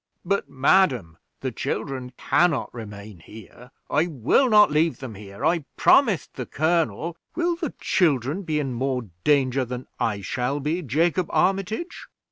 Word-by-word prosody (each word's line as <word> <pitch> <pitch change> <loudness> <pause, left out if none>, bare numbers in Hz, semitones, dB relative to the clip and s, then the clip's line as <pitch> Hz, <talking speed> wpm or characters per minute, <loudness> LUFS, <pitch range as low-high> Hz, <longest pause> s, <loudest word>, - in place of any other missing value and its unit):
"But, 200 -5 -1
madam, 130 - +2 0.2
the 130 - -2
children 130 0 -4
can 175 - +3
not 145 -6 -3
remain 105 -4 -9
here. 110 +6 -14 0.2
I 155 +4 +1
will 155 - +2
not 210 -5 +6
leave 155 +2 +2
them 130 -4 -7
here. 100 +5 -7
I 165 -2 +1
promised 225 - +4
the 125 - -6
colonel 165 +1 0
" - - -43
"Will 345 0 +1
the 335 -5 -5
children 150 - +1
be 155 -5 -1
in 135 -4 -2
more 125 -2 -2
danger 135 -3 +2
than 125 +1 -6
I 105 -3 -1
shall 125 +8 -2
be, 155 +5 -1
Jacob 165 +5 +1
Armitage?" 195 - -1
145 Hz, 155 wpm, -24 LUFS, 125-175 Hz, 0.2 s, not